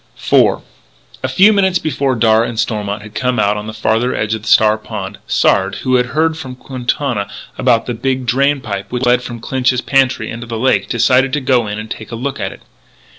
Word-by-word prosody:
IV - - +4 0.6
A - - -1
few 190 +11 +5
minutes 190 -3 +2
before 140 -5 -1
Darragh 115 0 +3
and 115 - -5
Stormont 105 -2 -2
had 105 0 -12
come 125 +2 -1
out 105 +1 +2
on 105 +1 -5
the - - -4
farther 110 +3 0
edge 110 0 -1
of 110 -1 -5
Star 110 0 +5
Pond, 105 -2 -7
Sard, 95 0 +2
who 130 - 0
had 125 0 +1
heard 160 +4 +1
from 130 -4 -7
Quintana 125 -4 -3 0.3
about 115 -3 +2
the 120 - -3
big 130 +2 -2
drain 140 +3 +1
pipe 100 -4 -5
which 125 +1 -1
led 125 0 +3
from 120 -1 -7
Clinch's 125 +1 0
pantry 130 -5 +1
into 120 +1 -7
the 115 0 -4
lake, 130 +3 +1
decided 130 +3 +3
to 150 - +1
go 125 -4 +1
in 105 0 -4
and 110 +1 -7
take 110 - -7
a - - -4
look 130 +4 -4
at - - -3
it. - - -13
120 Hz, 215 wpm, -16 LUFS, 110-130 Hz, 0.6 s, few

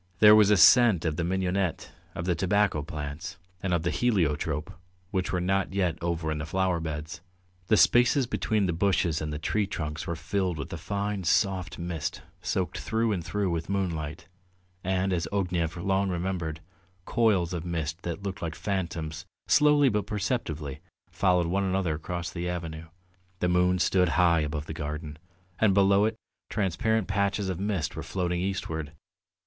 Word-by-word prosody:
There 105 +2 +8
was 105 -2 +6
a 105 - +5
scent 105 -1 +6
of 80 -2 0
the 85 - -1
mignonette, 95 0 -1 0.2
of 85 - -4
the 90 - +2
tobacco 95 -1 +1
plants, 75 +2 -6 0.2
and 95 - -2
of 85 -2 +1
the 85 - 0
heliotrope, 80 -9 0 0.4
which 95 -2 -1
were 90 - 0
not 95 +1 0
yet 90 -4 0
over 85 -2 -1
in 75 - -2
the 75 - -3
flower 95 0 +1
beds. 80 +1 -5 0.5
The 110 - +4
spaces 125 +4 +5
between 110 -3 0
the 90 - 0
bushes 85 -3 +1
and 75 0 -3
the 75 - -3
tree 100 +7 0
trunks 75 -2 -4
were 85 - -2
filled 90 +1 -1
with 75 - -6
a - - -3
fine 100 +3 -3
soft 95 +1 +1
mist 85 -3 -4 0.2
soaked - - -2
through 115 0 0
and 90 -5 -1
through 100 +1 -1
with 85 +1 -3
moonlight, 85 -4 -3 0.6
and, 95 +1 0
as 85 -2 -1
Ognev 90 -4 -1
long 95 +2 +1
remembered, 85 -3 -3 0.4
coils 100 -8 +2
of 85 -2 -3
mist 85 -1 -3
that 85 +3 -5
looked 100 -2 -4
like 80 -2 -3
phantoms 85 -4 -3 0.2
slowly 150 -1 +5
but 105 -4 0
perceptibly 95 - -3 0.3
followed 90 -3 +2
one 95 +4 0
another 95 -3 0
across 85 +2 -4
the 90 0 -3
avenue. 80 -2 -5 0.5
The 90 - 0
moon 90 +1 +3
stood 90 -1 +3
high 85 -2 +5
above 75 -1 -2
the 80 - -6
garden, 75 0 -5 0.4
and 105 -4 +4
below 100 +1 +5
it 110 0 0 0.3
transparent 110 +2 0
patches 100 0 0
of 90 -2 -3
mist 95 -6 -2
were - - -4
floating 90 -2 -2
eastward. 90 -5 -3
90 Hz, 170 wpm, -27 LUFS, 80-100 Hz, 0.6 s, There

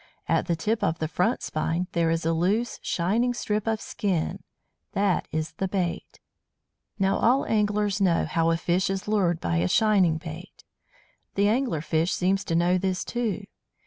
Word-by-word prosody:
At - - +1
the 170 - +1
tip 210 +6 -1
of 165 -4 +1
the 160 - -2
front 180 +9 0
spine 165 +3 -1
there 170 -1 +1
is 165 0 0
a 165 - +2
loose, 200 +8 0
shining 225 +8 0
strip 210 -2 -2
of 220 -1 +1
skin 185 -7 -2 0.5
that 200 -2 +1
is 155 0 -2
the 190 - -3
bait. 180 -3 -3 0.8
Now, 195 -1 +2
all 255 +4 +3
anglers 210 -2 +1
know 175 -4 +3
how 165 +1 +1
a 165 - +2
fish 180 +3 0
is 195 +1 -3
lured 185 -6 +1
by 85 - -1
a 85 +2 +2
shining 190 - +3
bait. 165 +2 -9 0.7
The 200 +1 +3
Angler 225 - +1
fish 160 +2 0
seems 190 +2 +1
to 165 - -1
know 175 +2 +3
this 185 -2 -1
too. 225 -4 -2
185 Hz, 175 wpm, -26 LUFS, 165-210 Hz, 0.8 s, all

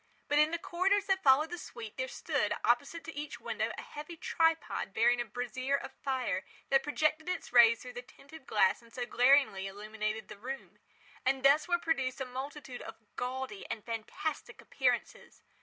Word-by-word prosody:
But 290 +1 +3
in 300 +1 +5
the 335 - -1
corridors 380 +4 +1
that 385 -1 +1
followed 290 +3 +5
the 350 - -4
suite, 225 -7 -8
there 260 0 -2
stood, - - -1
opposite 335 -1 +1
to 325 - -8
each 295 +1 -5
window, - - -2
a - - -6
heavy 305 +3 -8
tripod, 325 -12 0
bearing 240 +2 +4
a - - -3
brazier 255 +3 -2
of 275 - -4
fire, 265 -1 -2 0.3
that 270 0 +6
projected 310 +3 0
its 365 - -4
rays 230 -1 +7
through 250 -1 -8
the 245 - -5
tinted 275 +3 -15
glass 200 +1 +3
and 230 0 -19
so 245 0 -3
glaringly 245 -6 +4
illumined 215 +2 -4
the - - -10
room. 265 +4 -7 0.4
And 265 0 +1
thus 290 +4 +6
were 350 -1 +3
produced 275 -7 -1
a 265 - -2
multitude 265 0 -6
of 225 - -8 0.2
gaudy 250 -4 -4
and 215 - -5
fantastic 230 +6 -4
appearances. - - -2
265 Hz, 180 wpm, -32 LUFS, 240-305 Hz, 0.4 s, rays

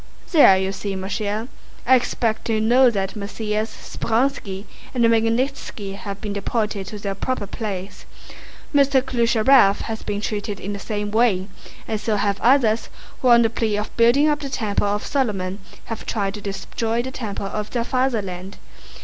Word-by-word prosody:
"There, 290 - +7
you 190 0 -1
see, 195 0 -4
mon 190 +1 -5
cher! 215 +2 -2 0.4
I 260 - +6
expect 230 -2 -1
you 220 -1 +2
know 245 +4 +5
that 195 -3 -2
Messrs. 210 +1 -2
Speránski 220 -5 -2 0.3
and 240 -2 +3
Magnítski 230 -2 0
have 200 0 -6
been 205 -1 -4
deported 205 -1 -2
to 210 - -6
their 200 -1 -3
proper 210 +2 -2
place. 200 -2 -6 0.7
Mr. 275 -2 +4
Klyucharëv 235 -3 +4
has 220 -1 -5
been 205 -1 -3
treated 205 -1 -3
in 205 +2 -4
the 200 - -5
same 205 0 -3
way, 215 -4 +2 0.4
and 215 -2 -2
so 215 0 0
have 200 -1 0
others 235 -3 +3 0.3
who 255 - +2
on 235 -1 +7
the 225 - +3
plea 220 -3 0
of 210 - -4
building 240 +6 +5
up 295 -1 +2
the 280 -2 -5
temple 210 -5 -1
of 205 +1 -1
Solomon 205 -9 -1 0.3
have 225 - -6
tried 200 -3 -1
to 210 - -7
destroy 225 +4 -2
the 260 - -5
temple 215 -6 -5
of 210 +1 -4
their 240 -2 -1
fatherland. 205 -8 -2
215 Hz, 170 wpm, -22 LUFS, 200-235 Hz, 0.7 s, There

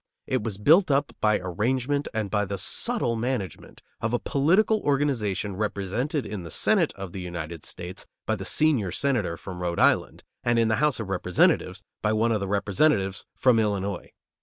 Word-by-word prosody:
It 130 - -1
was 110 -4 -3
built 160 - +5
up 140 0 +1
by 105 -1 +3
arrangement 125 +10 -1
and 110 -3 -3
by 105 -1 +2
the 100 0 -4
subtle 225 - 0
management 115 - -4 0.2
of 115 +1 -1
a - - +3
political 190 +10 +2
organization 120 -9 0
represented 110 - -2
in 105 -3 -5
the 85 - -8
Senate - - +2
of 95 -2 -7
the 95 - -6
United 85 -3 -6
States 90 +2 -8 0.2
by 110 - 0
the 95 - -6
senior 130 - +2
Senator 105 -7 0
from 90 0 -8
Rhode 85 -1 -2
Island, - - +2 0.2
and 120 0 +2
in 115 -1 +3
the 110 - +2
House 150 0 +1
of 110 -4 -5
Representatives 90 -1 +1 0.2
by 105 0 +1
one 115 +2 +2
of 110 - +1
the 100 - -3
Representatives 100 0 +1
from 125 -3 +4
Illinois. 100 -3 -1
110 Hz, 180 wpm, -26 LUFS, 95-130 Hz, 0.2 s, built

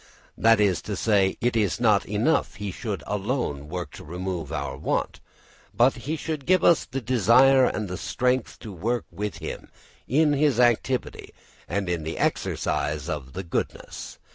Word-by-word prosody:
That 115 -1 +4
is 100 -5 +2
to - - -1
say, 100 -4 +2
it 120 0 +1
is 105 -3 +1
not 105 -4 +3
enough 105 +5 +1
he 100 0 -4
should 105 0 -5
alone 100 - -2
work 90 +1 -5
to 95 - -11
remove 90 -2 -5
our 70 -4 -3
want, 70 - -2 0.6
but 125 +3 +5
he 140 +6 -4
should 155 -3 -5
give 185 -1 +4
us 170 - +5
the 135 +1 -4
desire 130 +3 +5
and 105 -3 -1
the 90 0 -5
strength 125 0 -1
to 105 - -8
work 115 +6 -2
with 105 +4 -4
him - - -7 0.4
in 150 +3 +3
his 145 -4 +2
activity 125 +1 +1 0.3
and 100 -2 -1
in 85 -2 -1
the 80 +1 -5
exercise 75 0 -1
of 70 -4 -5
the 95 - -4
goodness. 85 - -5
105 Hz, 165 wpm, -25 LUFS, 90-125 Hz, 0.6 s, but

